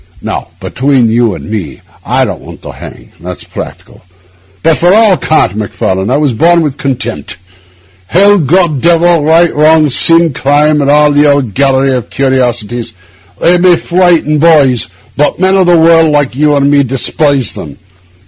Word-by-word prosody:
Now, - - -5
between 130 -3 -1
you 115 -3 0
and - - -10
me, 100 -10 -6 0.2
I - - 0
don't - - -6
want - - -13
to - - -8
hang—that's 90 +2 -11
practical; - - -10 0.6
but 160 -1 +1
for 175 +1 +2
all 215 -1 +4
cant, 155 - 0
Macfarlane, 95 -2 -3
I 130 - +1
was 145 -4 -1
born 170 +8 +2
with 150 -4 -2
a - - -27
contempt. 120 -6 -5 0.7
Hell, 200 +3 +3
God, 160 -2 0
Devil, 170 0 +2
right, 165 +2 +2
wrong, 155 0 +3
sin, 165 +4 +3
crime, 150 +3 +1
and 140 - -1
all 150 0 +3
the 145 0 +3
old 135 -7 -1
gallery 135 +1 +1
of 125 -4 -4
curiosities—they 120 - -3
may 180 0 +4
frighten 170 -4 0
boys, 145 -7 +2 0.3
but 150 - -1
men 190 +1 +1
of 190 -2 +2
the 175 -1 +4
world, 165 0 +3
like 145 -4 0
you 150 +2 +1
and 140 0 +1
me, 145 -1 +3
despise 135 0 -1
them. 70 -3 -10
145 Hz, 165 wpm, -9 LUFS, 125-165 Hz, 0.7 s, all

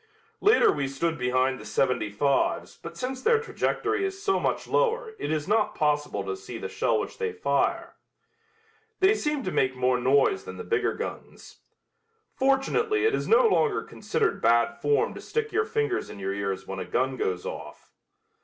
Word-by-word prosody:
Later 425 +2 +5
we 140 -2 -2
stood 160 +4 -2
behind 130 +1 +1
the - - -10
seventy 125 -5 0
fives 135 +7 0
but - - -10
since 255 0 -4
their 460 - +4
trajectory 425 -2 -1
is 390 0 -3
so 390 -2 +2
much - - -1
lower 480 -2 +1
it - - -3
is 155 -2 -1
not 215 +1 +1
possible 150 -1 0
to 410 - -3
see 395 +2 -8
the - - -5
shell - - 0
which - - -6
they 450 -1 -1
fire. 440 0 0 1.1
They 385 +2 +5
seemed 300 - -2
to 185 - -2
make 130 -1 +1
more 125 0 +1
noise 140 - +3
than 455 - -8
the - - -6
bigger 455 - 0
guns. - - -8 0.8
Fortunately 390 +11 +1
it 440 - +3
is - - -1
no 470 +2 +5
longer 430 -1 +2
considered 445 -2 -2
bad 115 +1 +3
form 145 +2 +2
to - - -9
stick 450 -1 -2
your 440 +1 +1
fingers 440 -3 -1
in - - -9
your 95 0 -3
ears 100 -1 -3
when 95 0 -6
a 95 - -4
gun 130 +2 0
goes 90 -7 -2
off. - - -8
255 Hz, 180 wpm, -26 LUFS, -, 1.1 s, Later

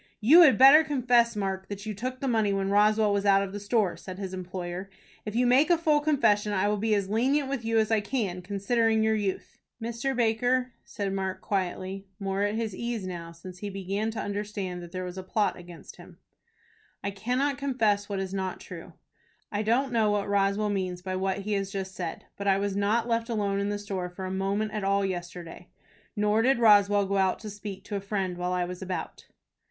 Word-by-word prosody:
"You 290 +11 +8
had 300 -6 +7
better 275 +4 +9
confess, 245 -6 +2
Mark, 190 -2 -3
that 200 0 -6
you 215 - -3
took 255 +5 -5
the 275 - -1
money 220 -4 +2
when 195 0 -1
Roswell 210 +1 +4
was 200 0 0
out 195 -1 +4
of 195 -1 -6
the 205 - -4
store," 205 -2 +1
said 185 -1 -9
his 190 -2 -5
employer. 185 0 -5 0.4
"If 210 - -4
you 250 +1 +3
make 260 +7 +4
a 345 - +5
full 310 -2 +3
confession, 215 -9 +2
I 195 +1 +1
will 210 - 0
be 220 0 +2
as 200 -2 -1
lenient 265 +7 +1
with 270 -4 -3
you 225 0 0
as 220 0 +2
I 220 -2 +3
can, 205 -5 -2
considering 220 +3 +1
your 220 0 +2
youth." 205 -3 -3 0.2
"Mr. 235 +4 -3
Baker," 245 +2 +1
said 200 -2 -4
Mark, 190 -1 -3
quietly, 190 0 -3
more 195 0 -2
at 205 +1 0
his 225 -2 -2
ease 235 -3 -3
now, 170 -2 -6
since 180 +2 -11
he 205 - -4
began 195 +2 -3
to 225 -1 -5
understand 205 -3 -4
that 175 -1 -10
there 185 0 -4
was 180 +1 -6
a - - -6
plot 205 +3 0
against 175 -1 -12
him, - - -14 0.9
"I 200 - -2
cannot 250 +7 -1
confess 220 -7 0
what 200 -1 -2
is 190 0 -4
not 190 -1 -3
true. - - -10 0.6
I 205 - -1
don't 245 +4 +1
know 220 -2 +3
what 205 -1 0
Roswell 200 +1 +1
means 185 -2 -3
by 185 0 -3
what 190 +1 -1
he 210 +2 -3
has 195 -1 -2
just 190 -1 -4
said, 175 -3 -5
but 200 - -4
I 195 -1 +4
was 200 0 -2
not 210 +4 +1
left 230 0 0
alone 200 -3 0
in 200 0 -1
the 205 - -1
store 195 -3 -4
for 185 +2 -7
a 185 - -4
moment 200 +3 -1
all 200 +1 +2
day 195 - 0
yesterday, 175 -1 -7 0.5
nor 210 +1 +2
did 260 +2 +3
Roswell 205 -3 +5
go 200 +1 -1
out 190 -1 +2
to 215 - -7
speak 205 -1 -8
to 205 - -6
a 200 - -2
friend 195 -3 -3
while 180 0 -1
I 180 -1 0
was 180 +1 -7
about." 185 -1 -5
205 Hz, 220 wpm, -27 LUFS, 190-225 Hz, 0.9 s, better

